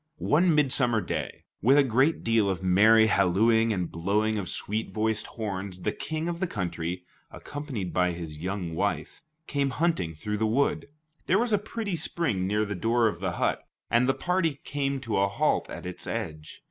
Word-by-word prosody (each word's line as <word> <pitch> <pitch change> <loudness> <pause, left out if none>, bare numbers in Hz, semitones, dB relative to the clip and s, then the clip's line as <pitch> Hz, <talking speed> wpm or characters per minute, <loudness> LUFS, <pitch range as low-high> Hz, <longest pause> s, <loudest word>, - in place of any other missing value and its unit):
One 165 +2 +3
midsummer 130 -5 +3
day, 90 - -4 0.2
with 130 +7 +5
a 145 - +7
great 135 +5 +2
deal 115 -3 +2
of 95 -1 -3
merry 110 +5 +6
hallooing 110 +3 +3
and 90 -5 -2
blowing 105 +5 0
of 90 - -4
sweet 110 +2 -2
voiced 110 0 -1
horns, 95 -4 -5
the - - 0
King 160 +1 -4
of 170 -1 -3
the 190 - 0
country, 85 - -3 0.3
accompanied 140 - -6
by 90 -1 +2
his 80 -3 -7
young 90 -1 -3
wife, 80 -3 -2 0.2
came 140 -2 0
hunting 125 - 0
through 105 +6 -3
the 110 +1 +1
wood. 135 +6 +1 0.4
There 185 - +4
was 235 0 +1
a 205 - +4
pretty 210 -2 -4
spring 135 - -1
near 105 +2 +1
the 105 - -3
door 115 +4 +2
of 85 -6 -3
the 95 -1 -2
hut, - - -1 0.3
and 125 +2 +3
the 135 - +3
party 170 -5 0
came 140 -1 -2
to 115 -6 -1
a 100 - +3
halt 100 - 0
at - - -7
its 90 0 -7
edge. 75 -1 -5
110 Hz, 185 wpm, -27 LUFS, 95-140 Hz, 0.4 s, a